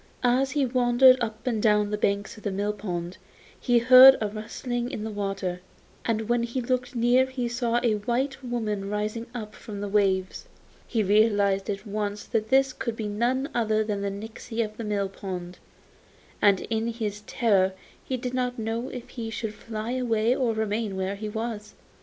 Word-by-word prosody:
As 255 Hz, +2 st, +3 dB
he 285 Hz, -2 st, +2 dB
wandered 255 Hz, +1 st, +5 dB
up 220 Hz, -2 st, -4 dB
and 230 Hz, -4 st, 0 dB
down 210 Hz, -1 st, +4 dB
on 205 Hz, -, -2 dB
the -, -, +1 dB
banks 200 Hz, 0 st, 0 dB
of 215 Hz, -, -13 dB
the 205 Hz, -, -2 dB
mill 205 Hz, +2 st, -1 dB
pond 180 Hz, -3 st, -5 dB, 0.4 s
he 245 Hz, -1 st, +2 dB
heard 255 Hz, +3 st, +9 dB
a 215 Hz, -, 0 dB
rustling 240 Hz, +3 st, -4 dB
in 215 Hz, -, -5 dB
the 220 Hz, -, -4 dB
water, 195 Hz, -3 st, -3 dB, 0.4 s
and 220 Hz, -2 st, -1 dB
when 240 Hz, 0 st, +2 dB
he 235 Hz, +2 st, -2 dB
looked 250 Hz, +1 st, -2 dB
near 245 Hz, +2 st, +4 dB
he 260 Hz, -2 st, -3 dB
saw 240 Hz, 0 st, 0 dB
a 235 Hz, -3 st, +3 dB
white 260 Hz, +5 st, -2 dB
woman 215 Hz, -5 st, -2 dB
rising 210 Hz, +3 st, -3 dB
up 215 Hz, -3 st, -6 dB
from 205 Hz, -2 st, -8 dB
the 205 Hz, -, -3 dB
waves. 195 Hz, -2 st, 0 dB, 0.4 s
He 225 Hz, -3 st, 0 dB
realised 200 Hz, -1 st, +3 dB
at 200 Hz, +1 st, -3 dB
once 205 Hz, 0 st, -3 dB
that 220 Hz, -1 st, -2 dB
this 270 Hz, 0 st, +4 dB
could 235 Hz, -3 st, -4 dB
be 220 Hz, -2 st, -4 dB
none 240 Hz, +6 st, 0 dB
other 220 Hz, -2 st, +1 dB
than 210 Hz, -2 st, -3 dB
the 200 Hz, -, -1 dB
nixy 220 Hz, +3 st, -4 dB
of 215 Hz, 0 st, -10 dB
the 230 Hz, -, -6 dB
mill 205 Hz, -2 st, -1 dB
pond, 180 Hz, -2 st, -7 dB, 0.8 s
and 200 Hz, -2 st, +4 dB
in 225 Hz, 0 st, -2 dB
his 215 Hz, -3 st, -3 dB
terror 195 Hz, -5 st, +2 dB, 0.3 s
he 260 Hz, -, -3 dB
didn't 250 Hz, 0 st, -2 dB
know 225 Hz, +2 st, -3 dB
if 245 Hz, -2 st, -8 dB
he 230 Hz, -2 st, -5 dB
should 225 Hz, -1 st, -4 dB
fly 220 Hz, +1 st, -5 dB
away 240 Hz, -2 st, +1 dB
or 250 Hz, -4 st, +1 dB
remain 220 Hz, -1 st, -1 dB
where 190 Hz, +1 st, -2 dB
he 210 Hz, +1 st, -5 dB
was. 220 Hz, -1 st, -5 dB
220 Hz, 190 wpm, -26 LUFS, 205-240 Hz, 0.8 s, heard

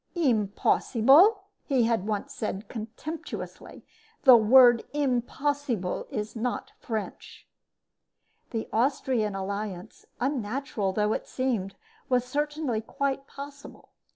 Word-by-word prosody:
"Impossible?" 270 Hz, -, +4 dB, 0.2 s
he 265 Hz, -5 st, +2 dB
had 225 Hz, -4 st, 0 dB
once 220 Hz, +6 st, -3 dB
said, 215 Hz, -4 st, -4 dB
contemptuously. 235 Hz, +8 st, -7 dB, 0.4 s
"The 260 Hz, -3 st, +9 dB
word 240 Hz, +1 st, +6 dB
'impossible' 270 Hz, -5 st, -1 dB
is 215 Hz, -5 st, -4 dB
not 240 Hz, +2 st, -3 dB
French." 220 Hz, -3 st, -6 dB, 1.0 s
The 225 Hz, -2 st, -4 dB
Austrian 235 Hz, -3 st, +1 dB
alliance, 200 Hz, 0 st, -5 dB
unnatural 250 Hz, -4 st, -2 dB
though 210 Hz, +2 st, +1 dB
it -, -, -4 dB
seemed, 230 Hz, -7 st, -2 dB, 0.3 s
was 250 Hz, -1 st, +2 dB
certainly 290 Hz, -3 st, -2 dB
quite 275 Hz, +4 st, -3 dB
possible. 280 Hz, 0 st, -11 dB
245 Hz, 95 wpm, -27 LUFS, 215-275 Hz, 1.0 s, The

